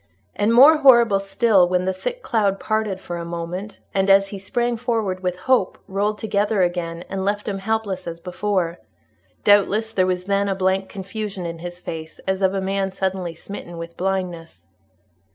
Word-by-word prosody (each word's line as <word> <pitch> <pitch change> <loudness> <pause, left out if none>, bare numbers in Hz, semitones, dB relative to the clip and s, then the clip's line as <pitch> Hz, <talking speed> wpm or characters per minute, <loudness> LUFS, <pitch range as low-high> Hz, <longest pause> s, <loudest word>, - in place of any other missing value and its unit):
And 210 +2 +2
more 280 +7 +8
horrible 235 -8 +6
still, 195 -2 +3
when 180 0 +1
the 190 - 0
thick - - -5
cloud 200 -4 +1
parted 215 -3 -1
for 175 -2 -6
a 170 - -4
moment, 170 +4 -5 0.2
and, 195 0 +1
as 195 0 +5
he 200 - -7
sprang 240 +4 -1
forward 225 -6 -1
with 180 -1 -2
hope, 255 -8 +2
rolled 205 +2 -1
together 205 -2 +1
again, 175 -1 -2
and 190 0 -3
left 205 +1 -1
him 195 -2 -2
helpless 220 -2 -2
as 165 0 -5
before; 180 -1 -2 0.6
doubtless, 205 +2 +3
there 185 -3 +2
was 180 -1 -1
then 200 +1 0
a 195 - 0
blank 190 0 0
confusion 195 -1 -5
in 165 -1 -5
his 175 +1 -7
face, 160 -2 -7
as 190 0 -1
of 190 0 +2
a 195 - -1
man 195 0 -1
suddenly 185 -3 -3
smitten 175 -1 -9
with 170 0 -7
blindness. 175 - -3
195 Hz, 180 wpm, -22 LUFS, 180-210 Hz, 0.6 s, more